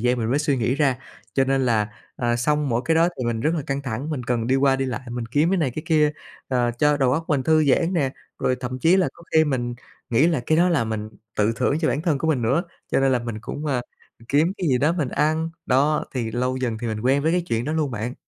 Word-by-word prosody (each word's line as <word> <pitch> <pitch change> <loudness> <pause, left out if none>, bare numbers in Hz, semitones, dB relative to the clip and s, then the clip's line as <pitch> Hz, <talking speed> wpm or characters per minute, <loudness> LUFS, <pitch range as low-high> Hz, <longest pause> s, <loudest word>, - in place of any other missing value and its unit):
gian 125 +1 +1
mình 115 0 -1
mới 140 - +2
suy 145 -2 +1
nghĩ 120 +2 0
ra. 140 -4 +1 0.4
Cho 135 - +3
nên 135 -1 +1
là, 110 -3 +2 0.3
à, 120 -1 0
xong 150 +3 +1
mỗi 120 +1 0
cái 160 - +2
đó 165 +1 +4
thì 125 - -2
mình 115 -1 -1
rất 155 +7 +1
là 155 - -2
căng 135 0 -2
thẳng, 130 +4 -4
mình 140 -5 -3
cần 120 -2 -1
đi 130 +2 +2
qua 135 0 +3
đi 135 - -1
lại, 130 -1 -3
mình 120 -1 -4
kiếm 145 +8 +2
cái 195 - +2
này 150 -6 +1
cái 155 +6 -6
kia, 150 -2 +3 0.4
ờ, 125 -2 +1
cho 150 +2 +3
đầu 130 -3 +2
óc 160 +3 0
mình 140 -4 +1
thư 155 +2 +3
giãn 165 +6 +2
nè, 140 -7 +1 0.3
rồi 130 - +1
thậm 125 0 -4
chí 165 +8 +4
là 190 - +2
có 170 - -16
khi 160 0 +5
mình 120 -4 -1 0.4
nghĩ 125 +7 +4
là 165 -6 +1
cái 155 - +3
đó 180 +1 +4
là 155 -9 +2
mình 110 -1 -4 0.3
tự 105 +2 +2
thưởng 140 +4 +1
cho 160 - +1
bản 150 - -1
thân 155 -5 +1
của 160 - -1
mình 135 -7 +1
nữa. 135 +10 +2 0.3
Cho - - +3
nên 135 -1 +3
là 125 - +3
mình 115 -2 -5
cũng, 145 +7 -6
ơ, 130 -4 0 0.5
kiếm 155 +6 +3
cái 180 -5 0
gì 125 - +3
đó 150 +6 +2
mình 155 -7 -1
ăn, 155 +4 0 0.2
đó, 145 +4 +2
thì 115 -3 -2
lâu 125 +2 -1
dần 120 -4 -2
thì 120 - -4
mình 110 -1 -3
quen 135 +4 +2
với 160 +2 +2
cái 180 0 +1
chuyện 115 +1 0
đó 150 - -2
luôn 155 -3 0
bạn. 115 +2 -4
135 Hz, 280 wpm, -23 LUFS, 120-155 Hz, 0.5 s, khi